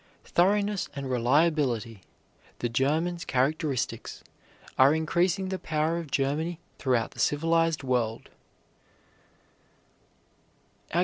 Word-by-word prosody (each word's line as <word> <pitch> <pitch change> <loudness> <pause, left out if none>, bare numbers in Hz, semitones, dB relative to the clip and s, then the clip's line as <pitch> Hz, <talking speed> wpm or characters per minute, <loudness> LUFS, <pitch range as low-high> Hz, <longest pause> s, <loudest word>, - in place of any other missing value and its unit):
Thoroughness 200 +2 +1
and 135 -2 -4
reliability, 125 - +1 0.6
the 120 - -2
German's 160 +8 0
characteristics, 135 0 -1 0.5
are 135 +4 +5
increasing 175 +4 0
the 190 -1 -3
power 160 +2 -1
of 165 -3 -7
Germany 150 +5 -1 0.2
throughout 125 -5 +1
the - - -14
civilized 165 +1 +1
world. 120 -4 -1
150 Hz, 85 wpm, -27 LUFS, 130-170 Hz, 0.6 s, are